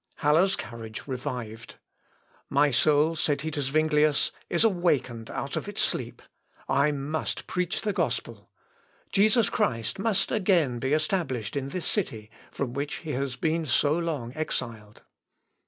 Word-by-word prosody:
Haller's 165 +6 +4
courage 115 -2 -7
revived. 125 -4 -5 0.7
"My 145 +1 +4
soul," 150 +5 +4
said 145 -2 0
he 160 +1 -3
to 145 -1 -2
Zuinglius, 150 +1 +3 0.2
"is 170 - +3
awakened 160 - +1
out - - -4
of - - -3
its - - -6
sleep. - - -3 0.4
I 140 +2 +3
must 145 +2 -3
preach 180 -1 -1
the 210 -2 -1
gospel. - - -2 0.6
Jesus 215 +2 +4
Christ 115 - 0
must 195 -2 +1
again 175 - +2
be 135 +3 0
established 155 - -1
in 135 -1 -2
this 180 +4 -4
city, 110 - -2 0.2
from 130 -4 -3
which 145 +2 -2
he 155 - -2
has 135 -1 -2
been 160 +3 0
so 145 +3 +3
long 155 -8 -2
exiled." 115 -9 -4
145 Hz, 140 wpm, -27 LUFS, 125-170 Hz, 0.7 s, Haller's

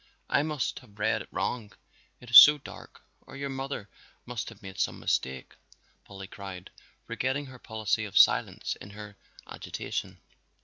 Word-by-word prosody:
"I - - +4
must 150 -3 -2
have 105 -5 -20
read - - +1
it - - -10
wrong, 110 -5 -3 0.5
it 125 -1 -13
is 125 - +11
so 150 0 +9
dark, 100 -11 -13 0.2
or - - -10
your 140 0 -4
mother 135 -5 -5 0.4
must 125 -1 -5
have 115 -2 -16
made 95 +1 -9
some - - -1
mistake!" 65 -1 -2 0.5
Polly 95 -1 -9
cried, 95 -1 -9 0.3
forgetting 130 +3 -2
her 130 -2 -12
policy 110 -2 -2
of 100 - -4
silence - - +4
in 100 - -11
her 105 0 -10 0.3
agitation. - - -6
110 Hz, 160 wpm, -28 LUFS, 100-130 Hz, 0.5 s, is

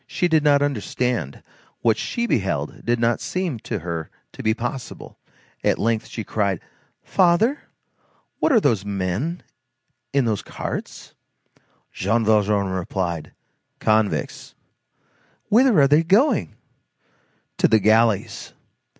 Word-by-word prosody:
She 180 - 0
did 160 -3 +2
not 145 -1 +4
understand; 125 - -2 0.4
what 115 -2 +3
she 235 - -2
beheld 95 - -2
did 120 0 0
not 115 0 +1
seem 180 -10 -3
to 110 - -4
her 85 -1 -4 0.2
to - - -9
be 110 0 +1
possible; 120 +1 -6 0.4
at - - +2
length 115 0 0
she 110 - -6
cried:— 100 -4 -1 0.4
"Father! 190 +10 +2 0.8
What - - +2
are 240 - +6
those 110 - +1
men 100 - -3 0.7
in 140 -2 +2
those 110 -4 0
carts?" - - -7 0.8
Jean 110 +5 0
Valjean 105 -2 +2
replied: 90 -3 -3 0.4
"Convicts." 110 -1 0 0.9
"Whither 235 - +5
are 140 - +6
they 150 +3 +5
going?" 195 - +2 1.0
"To - - +5
the 110 - +4
galleys." 110 0 +1
115 Hz, 120 wpm, -22 LUFS, 100-150 Hz, 1.0 s, are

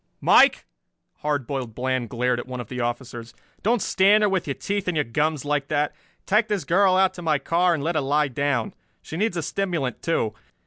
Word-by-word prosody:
"Mike!" - - +5 0.5
Hard 145 -3 -2
Boiled 125 -4 -5
Bland 130 -2 -1
glared 125 0 0
at 120 - -7
one 125 -1 -6
of 120 - -7
the 125 - -5
officers. 120 -1 -5 0.3
"Don't 230 +2 +1
stand 205 +3 +4
there 210 - +3
with 190 -4 -1
your 140 - -2
teeth 195 +9 -3
in 180 - 0
your 150 - +2
gums 150 +4 -1
like 145 -1 -1
that. 150 0 0 0.3
Take 215 +2 +2
this 210 -4 -1
girl 185 +2 +3
out 190 0 +3
to 175 - -9
my 155 -3 +1
car 170 +4 +2
and 140 - -4
let 170 +3 0
her 155 - +1
lie 145 +1 +1
down. 135 -3 -1 0.3
She - - -8
needs 195 0 0
a 165 - -2
stimulant, 170 -8 -2
too. 115 -10 0
150 Hz, 215 wpm, -24 LUFS, 130-180 Hz, 0.5 s, Mike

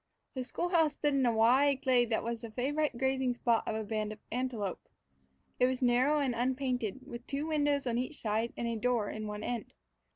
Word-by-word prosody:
The 260 - -3
school 345 +7 -3
house 325 -4 +3
stood 290 0 0
in 270 -2 +3
a - - +4
wide 260 +5 +4
glade 245 -3 +3
that 225 - 0
was 235 -1 -3
the 230 - -7
favorite 275 +4 -1
grazing 265 -1 +1
spot 235 -2 +1
of 220 - -1
a 220 - -2
band 215 0 -2
of 215 - -7
antelope. 235 -6 -3 0.7
It 250 - +5
was 255 0 -1
narrow 250 +5 +4
and 275 -4 +1
unpainted, 250 -2 -1
with 240 +1 -8
two 280 +1 -2
windows 290 -3 +1
on 240 -1 0
each 255 +5 -4
side 220 +2 -1
and 235 - -2
a 230 - -1
door 230 -2 0
in 215 0 -5
one 210 0 -5
end. 235 -2 -4
250 Hz, 215 wpm, -32 LUFS, 230-270 Hz, 0.7 s, It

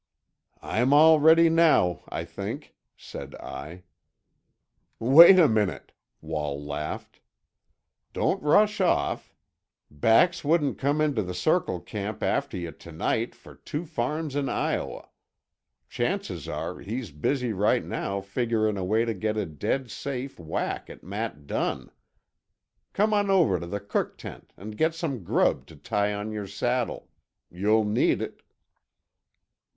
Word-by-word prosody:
"I'm 125 +5 +1
all 155 +1 +7
ready 160 +2 +6
now, 160 - +3
I - - -4
think," - - -7 0.2
said - - -9
I. 85 +4 -9 1.1
"Wait 165 +10 +9
a 170 -4 +7
minute," 105 -5 -1 0.3
Wall 75 -3 -3
laughed. 75 +1 -6 0.9
"Don't - - 0
rush 205 +7 +3
off. 170 - 0 0.6
Bax 115 - +3
wouldn't 150 -1 +1
come 145 +3 +1
into 145 -7 +1
the 90 -2 -5
Circle 155 - 0
camp 105 +2 -5
after 140 -8 -1
yuh 85 -2 -5
to 85 - -14
night 110 +8 -1
for - - -15
two 155 +4 -6
farms 150 0 -3
in 140 -2 -1
Iowa. - - -2 0.8
Chances - - -3
are 80 +4 -4
he's 115 -1 -5
busy 120 - -1
right 105 +2 +1
now 100 0 -3
figuring 110 +1 -1
a 95 - -3
way 110 +5 +1
to 115 - -1
get 110 +2 -2
a 105 - 0
dead 105 - -3
safe 135 -1 -5
whack 80 -2 -4
at - - -12
Matt 100 -6 -5
Dunn. - - -3 1.0
Come 215 +2 +2
on 205 -1 +2
over 170 - +3
to 85 - -7
the 100 +4 -3
cook 100 0 -3
tent - - -10
and 105 +2 -9
get 160 +1 +1
some 140 - -4
grub - - +1
to - - -14
tie 105 0 -1
on 105 +1 -4
your 105 -2 -5
saddle. 120 +5 -2 0.4
You'll 105 +5 +2
need 105 +1 +2
it." - - -8
110 Hz, 140 wpm, -26 LUFS, 95-150 Hz, 1.1 s, Wait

